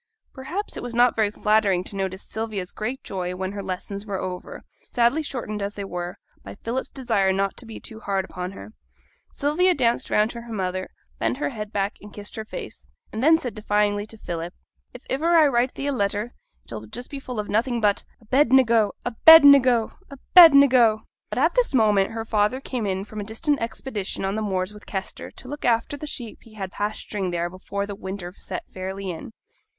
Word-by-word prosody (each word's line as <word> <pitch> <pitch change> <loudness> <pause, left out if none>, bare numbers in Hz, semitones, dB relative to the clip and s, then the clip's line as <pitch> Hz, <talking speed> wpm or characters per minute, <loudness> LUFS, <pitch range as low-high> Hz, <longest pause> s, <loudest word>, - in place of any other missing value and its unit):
Perhaps 310 +10 -5
it - - -5
was 245 -1 -6
not 245 +1 +4
very 220 -2 +2
flattering 210 -3 +2
to 200 - -7
notice 190 0 -3
Sylvia's 215 -4 -4
great 245 +5 -4
joy 180 -2 -4
when 190 +1 -3
her 200 0 -5
lessons 195 +1 -5
were 200 -3 -4
over, 185 -1 -6 0.3
sadly 240 +6 +3
shortened 235 -8 -5
as 200 +1 -3
they 200 - -5
were 175 -1 -5 0.3
by - - -9
Philip's 235 +5 -4
desire 220 -8 +1
not 195 +1 0
to 240 - -8
be 225 - -8
too 220 -2 -9
hard 195 -3 -1
upon 180 0 -6
her. 215 - -11 0.6
Sylvia 350 +6 +2
danced 240 -3 +1
round 210 +2 +2
to 235 - -7
her 235 0 -11
mother, 185 -3 -3 0.3
bent - - 0
her 290 - -1
head 210 -5 -6
back, 200 0 -1
and 210 - -12
kissed 205 0 -8
her 220 - -5
face, - - -8 0.3
and 220 +3 -3
then 320 +2 +6
said 250 -7 -5
defyingly 210 -1 0
to 225 - -11
Philip, 175 -3 -5 0.4
'If 250 - -12
iver 330 +5 +2
I 315 - +7
write 250 -2 +1
thee 275 - -4
a 285 - +1
letter 210 -1 -1 0.3
it - - -23
shall 110 -2 -6
just 245 - -7
be 280 - -5
full 250 -4 -6
of 210 - -3
nothing 235 +3 0
but 205 -2 +2 0.2
"Abednego! 235 -3 +4
Abednego! 255 -2 +7 0.2
Abednego!"' 275 -7 +6 0.3
But - - -5
at 320 +7 +3
this - - +1
moment 210 -4 +4
her 225 0 -5
father 215 +3 +1
came 250 -5 -3
in 190 0 -2
from 215 0 -8
a - - -3
distant 250 +7 -1
expedition 220 -4 -3
on 195 - -1
the 220 - -2
moors 190 -1 -2
with 210 - -14
Kester 190 -1 -5
to - - -12
look 290 +3 -7
after 235 +4 +1
the 300 +1 -7
sheep 240 -6 -5
he 225 -2 -17
had 190 -3 -5
pasturing 205 -2 -3
there 175 0 -2
before 200 +2 -4
the 200 - -6
winter 190 -2 -6
set - - -6
fairly 190 0 -4
in. 175 +8 -8
215 Hz, 205 wpm, -24 LUFS, 195-250 Hz, 0.6 s, I